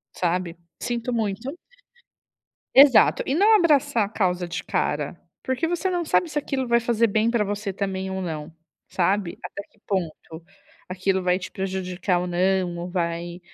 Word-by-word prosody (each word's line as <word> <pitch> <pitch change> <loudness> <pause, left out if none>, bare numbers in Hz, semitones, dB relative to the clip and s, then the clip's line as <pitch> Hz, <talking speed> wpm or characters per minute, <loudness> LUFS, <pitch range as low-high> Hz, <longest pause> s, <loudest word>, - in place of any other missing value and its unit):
Sabe. 175 -1 -1 0.2
Sinto 240 0 -2
muito. 225 - -2 1.2
Exato. 275 -3 +7
E 265 - -1
não 415 +8 +5
abraçar 290 - +3
a - - -8
causa 180 -4 0
de - - -3
cara, - - -2 0.2
porque 260 +5 -1
você 350 +3 -1
não 355 -1 -1
sabe 340 +2 +2
se 305 - -4
aquilo 275 -3 -2
vai 235 0 +3
fazer 230 0 +2
bem 220 +2 +1
pra 235 -2 +1
você 205 0 -3
também 190 -1 -3
ou 190 0 -3
não, 160 -2 -5 0.4
sabe. 190 0 0
Até - - -6
que 215 - -30
ponto 165 -3 -4 0.5
aquilo 190 +1 0
vai 180 0 +2
te 185 - -7
prejudicar 185 -1 -2
ou 180 - -3
não, 180 0 +1
ou 175 +1 -5
vai 170 -1 -3
195 Hz, 165 wpm, -24 LUFS, 180-240 Hz, 1.2 s, Exato